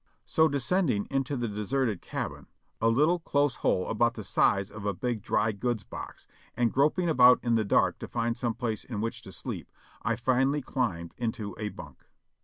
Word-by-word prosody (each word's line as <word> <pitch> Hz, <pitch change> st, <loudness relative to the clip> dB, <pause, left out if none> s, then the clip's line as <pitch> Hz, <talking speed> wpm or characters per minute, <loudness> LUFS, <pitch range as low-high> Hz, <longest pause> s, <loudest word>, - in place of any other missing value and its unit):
So 160 Hz, 0 st, +4 dB
descend 155 Hz, +5 st, +1 dB
ing 100 Hz, -3 st, 0 dB
into 135 Hz, 0 st, 0 dB
the 120 Hz, -1 st, -1 dB
deserted 105 Hz, +1 st, -1 dB
cabin, -, -, -5 dB, 0.3 s
a 115 Hz, -, +4 dB
little, 150 Hz, +9 st, +3 dB
close 145 Hz, -4 st, +1 dB
hole 90 Hz, -, +1 dB
about 120 Hz, +1 st, +1 dB
the 110 Hz, -, -6 dB
size 100 Hz, +1 st, +2 dB
of 105 Hz, -1 st, -8 dB
a 100 Hz, -2 st, -1 dB
big 120 Hz, 0 st, -2 dB
dry 110 Hz, +2 st, +1 dB
goods 110 Hz, +1 st, -2 dB
box, -, -, -9 dB, 0.3 s
and 120 Hz, -1 st, +2 dB
groping 150 Hz, +6 st, +2 dB
about 125 Hz, -5 st, +7 dB
in 120 Hz, -1 st, +1 dB
the 110 Hz, -1 st, +3 dB
dark 100 Hz, -, +2 dB
to -, -, -6 dB
find 115 Hz, 0 st, -1 dB
some 120 Hz, -2 st, -2 dB
place 110 Hz, -3 st, -3 dB
in 115 Hz, -5 st, -5 dB
which 115 Hz, +2 st, -3 dB
to -, -, -11 dB
sleep, -, -, -6 dB, 0.3 s
I 115 Hz, -, 0 dB
finally 130 Hz, +4 st, +1 dB
climbed 95 Hz, -12 st, -2 dB
into 110 Hz, -4 st, -3 dB
a 105 Hz, -1 st, -2 dB
bunk. 75 Hz, -9 st, -12 dB
120 Hz, 195 wpm, -28 LUFS, 105-135 Hz, 0.3 s, about